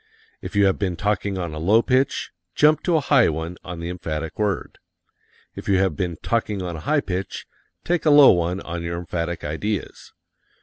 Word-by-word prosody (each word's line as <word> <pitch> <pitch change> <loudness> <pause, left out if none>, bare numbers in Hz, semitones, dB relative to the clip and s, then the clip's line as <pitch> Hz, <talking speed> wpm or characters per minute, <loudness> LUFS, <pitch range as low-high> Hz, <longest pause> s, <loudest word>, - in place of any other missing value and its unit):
If - - -8
you 100 0 +5
have 95 - +2
been 95 -4 -1
talking 100 0 -1
on 85 -4 -4
a 75 - -5
low 105 +8 +4
pitch, 130 +1 0 0.2
jump 150 +1 +4
to 175 - +2
a 155 - +3
high 140 -3 +4
one 80 +3 -4
on 90 -2 -7
the 85 +1 -5
emphatic 80 -2 -5
word. 105 -3 -2 0.8
If - - -7
you 95 - +4
have 95 -4 +1
been 85 -1 -3
talking 105 -4 -1
on 85 -2 -4
a - - -6
high 155 -1 +3
pitch, 95 -3 -4 0.4
take 175 -1 0
a - - +7
low 145 -2 +9
one 90 +2 0
on 85 0 -5
your 85 0 -4
emphatic 85 0 -4
ideas. 90 +5 -4
95 Hz, 200 wpm, -23 LUFS, 85-105 Hz, 0.8 s, low